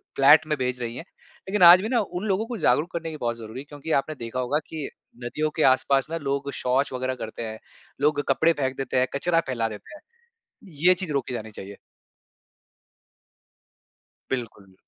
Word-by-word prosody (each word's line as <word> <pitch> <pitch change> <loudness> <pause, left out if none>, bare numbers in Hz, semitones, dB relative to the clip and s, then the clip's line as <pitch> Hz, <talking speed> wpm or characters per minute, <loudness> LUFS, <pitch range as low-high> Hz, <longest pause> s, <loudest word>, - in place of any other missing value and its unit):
Flat 145 +3 +6
में 150 - 0
भेज 125 -1 -2
रही 115 0 -4
है। - - -6 0.5
लेकिन 205 -2 +2
आज 180 +2 +9
भी 215 - -3
ना 245 -2 +2
उन 185 -1 -4
लोगों 200 +2 +1
को 245 - -4
जागरूक 170 -3 +2
करने 165 -1 -4
की 155 - -7
बहुत 120 -1 -1
ज़रूरी 115 +2 -8
है, - - -12
क्योंकि 145 +2 -7
आपने 155 +2 -8
देखा 115 -1 -5
होगा 130 +4 0
कि 155 -3 -5 0.4
नदियों 155 +6 -1
के 155 - +2
आस-पास 135 0 +1
ना 165 - -1
लोग 140 0 -2
शौच 130 +2 +1
वग़ैरह 130 0 -2
करते 110 +1 -6
हैं। 110 0 -6 0.4
लोग 145 0 +2
कपड़े 160 +5 +4
फेंक 130 0 -1
देते 135 -1 -2
हैं, 130 - +2
कचरा 165 +4 +2
फैला 115 -3 -1
देते 110 - -10
हैं। 305 - -14 0.9
ये 185 - +8
चीज़ 175 -5 -3
रोकी 135 -2 -2
जानी 110 -1 -6
चाहिए। 100 0 -9 2.5
बिल्कुल। 110 -7 -5
140 Hz, 190 wpm, -25 LUFS, 125-160 Hz, 2.5 s, आज